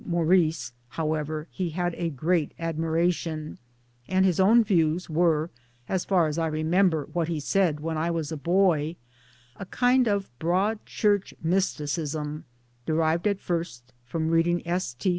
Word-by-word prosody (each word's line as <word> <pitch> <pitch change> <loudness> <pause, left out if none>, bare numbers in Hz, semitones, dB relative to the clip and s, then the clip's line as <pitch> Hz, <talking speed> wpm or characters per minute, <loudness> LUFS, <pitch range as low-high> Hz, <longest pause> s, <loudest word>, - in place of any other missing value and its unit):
Maurice, 165 -6 +1 0.2
however, 155 0 -2
he 185 -3 -3
had 175 +1 -2
a 170 0 -2
great 160 +2 0
admiration; 165 -1 -1 0.5
and 190 0 +2
his 185 -2 +2
own 225 +5 +6
views 170 -4 +1
were 160 0 +2 0.4
as 185 -2 -1
far 180 -4 +3
as 155 +1 -2
I 165 - +1
remember 160 0 +1
what 170 -2 0
ihe 165 - -1
said 160 -1 +1
when 160 0 -2
I 165 +2 0
was 165 -2 -2
a - - -2
boy 170 -1 +2 0.6
a 195 - -6
kind 250 +2 +3
of 200 - -1
Broad 190 +6 0
Church 205 -2 0
mysticism, 155 -3 -1 0.4
derived 160 +3 +1
at 200 -2 0
first 130 -10 -4
from 160 +6 -2
reading 170 +1 +1
S. 175 -8 -2
T. 185 - -1
165 Hz, 150 wpm, -26 LUFS, 155-185 Hz, 0.6 s, own